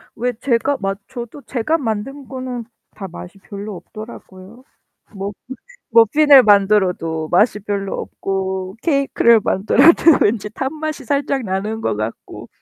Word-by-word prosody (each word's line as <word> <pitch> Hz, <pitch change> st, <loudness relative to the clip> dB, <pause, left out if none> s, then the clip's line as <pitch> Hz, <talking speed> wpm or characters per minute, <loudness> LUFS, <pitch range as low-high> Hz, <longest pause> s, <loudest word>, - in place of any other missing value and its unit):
왜 245 Hz, +2 st, -2 dB
제가 255 Hz, +4 st, 0 dB
마 195 Hz, 0 st, -2 dB
저도 245 Hz, +2 st, -8 dB
제가 270 Hz, +6 st, -1 dB
만든 265 Hz, +2 st, -4 dB
거는 255 Hz, -1 st, -5 dB, 0.3 s
다 195 Hz, -, -7 dB
맛이 180 Hz, +2 st, -10 dB
별로 200 Hz, +1 st, -8 dB
없더라고요. 215 Hz, +2 st, -12 dB, 0.5 s
뭐 195 Hz, +1 st, -4 dB, 0.6 s
머핀을 260 Hz, +5 st, +6 dB
만들어도 190 Hz, -6 st, +2 dB
맛이 210 Hz, +4 st, +3 dB
별로 200 Hz, -1 st, -3 dB
없고 190 Hz, -1 st, -4 dB
케이크를 275 Hz, -6 st, +3 dB
만들어도 280 Hz, -, +4 dB
왠지 210 Hz, 0 st, +1 dB
탄 265 Hz, +5 st, -3 dB
맛이 310 Hz, -3 st, -4 dB
살짝 280 Hz, 0 st, -1 dB
나는 210 Hz, +3 st, -3 dB
거 105 Hz, -, -1 dB
같고. 110 Hz, +2 st, -6 dB
220 Hz, 265 characters per minute, -19 LUFS, 195-265 Hz, 0.6 s, 머핀을